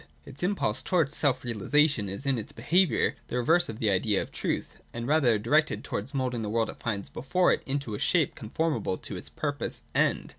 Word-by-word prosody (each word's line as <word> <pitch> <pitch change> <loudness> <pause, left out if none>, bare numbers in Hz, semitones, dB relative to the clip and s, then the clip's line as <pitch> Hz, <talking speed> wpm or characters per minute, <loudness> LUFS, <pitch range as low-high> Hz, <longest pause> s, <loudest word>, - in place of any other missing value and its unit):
Its 135 - -10
impulse 175 - 0
towards 155 -2 +1
self 130 -4 +2
realisation 120 0 +2
is 100 +9 -5
in 135 -3 +1
its 110 - -7
behaviour 175 +10 +2
the 125 - -3
reverse 165 +8 +3
of 110 - -5
the 110 -2 +1
idea 100 +1 +2
of - - -4
truth, - - -3 0.2
and 115 0 -3
rather 135 -7 +4
directed 150 +9 +1
towards 110 +7 -4
moulding 125 -3 -1
the 105 - -3
world 115 +1 0
it - - -16
finds 100 -4 -3
before 180 +8 +1
it - - -2
into 140 -4 -2
a 105 - -4
shape 165 -6 +2
conformable 115 - -2
to - - -8
its - - -6
purposed - - -3
End. - - +1
125 Hz, 200 wpm, -28 LUFS, 110-150 Hz, 0.2 s, rather